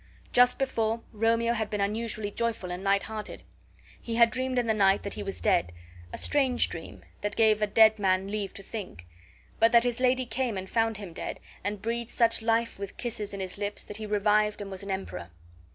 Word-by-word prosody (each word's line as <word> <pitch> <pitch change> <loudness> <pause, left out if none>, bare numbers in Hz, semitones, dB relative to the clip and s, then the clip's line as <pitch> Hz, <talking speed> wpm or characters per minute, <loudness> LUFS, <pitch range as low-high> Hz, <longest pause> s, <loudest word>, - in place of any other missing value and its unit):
Just 245 0 +5
before, 230 -4 0
Romeo 230 +2 +2
had 220 -2 -2
been 210 - -3
unusually 215 +1 -1
joyful 230 -5 -2
and 180 +2 -5
light 200 0 +2
hearted. 215 -1 -7 0.6
He 230 - -4
had 235 -1 +6
dreamed 255 0 -1
in 245 - +2
the 220 - +2
night 195 -2 +3
that 200 - -4
he - - -5
was 195 -1 -4
dead 85 0 +2 0.4
(a - - -5
strange 265 -4 +2
dream, - - -8 0.2
that 205 0 -2
gave 215 -1 +4
a 210 - +2
dead 220 +1 +5
man 190 -1 +2
leave 200 -1 -3
to 195 - -9
think) 190 - -7 0.6
and 225 0 +6
that 235 -1 +6
his 245 -1 -1
lady 255 0 +2
came 235 -2 -2
and 190 0 -5
found 225 0 +1
him 195 -5 -8
dead, - - -5 0.2
and 205 -1 -3
breathed 235 +1 -2
such 230 -1 +2
life 230 -1 0
with 200 -1 -6
kisses 225 -4 -3
in 200 - -5
his 190 +1 -4
lips 205 0 -3
that 210 - -7
he 215 -1 -6
revived 210 0 +2
and 200 -1 -6
was 190 - -6
an 200 - -8
emperor! 140 - -4
215 Hz, 215 wpm, -28 LUFS, 200-230 Hz, 0.6 s, had